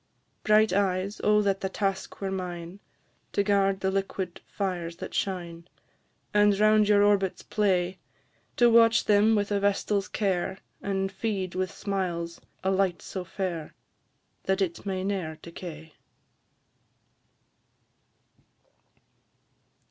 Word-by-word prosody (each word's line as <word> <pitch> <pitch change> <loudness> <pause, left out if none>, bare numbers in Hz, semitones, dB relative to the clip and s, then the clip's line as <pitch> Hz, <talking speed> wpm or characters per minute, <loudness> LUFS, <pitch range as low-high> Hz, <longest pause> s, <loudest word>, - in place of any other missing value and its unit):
Bright 215 +1 +4
eyes! 195 0 0
O 210 0 +4
that 195 -1 0
the 190 - -1
task 195 0 -3
were 195 -1 -2
mine, 180 -1 -5 0.5
To 200 - +2
guard 195 -1 +2
the 190 - +1
liquid 195 -2 -3
fires 175 -4 -3
that - - -8
shine, 170 -3 -3 0.7
And 205 -1 +4
round 215 0 +4
your 205 -1 +5
orbits 200 -2 +2
play 185 -3 0 0.6
To 240 - +6
watch 230 -1 +5
them 210 +1 +4
with 205 0 0
a 200 - +2
vestal's 200 0 +1
care, 190 -1 -1 0.2
And 195 -1 -1
feed 195 -3 -3
with 185 0 -1
smiles 175 -4 -3 0.2
a 190 - +2
light 190 -2 +1
so 185 - -5
fair, 180 -4 -4 0.7
That 190 +1 +1
it 185 0 -2
may 190 -1 -2
ne'er 185 -6 -2
decay! 165 -2 -9
195 Hz, 120 wpm, -27 LUFS, 180-205 Hz, 0.7 s, To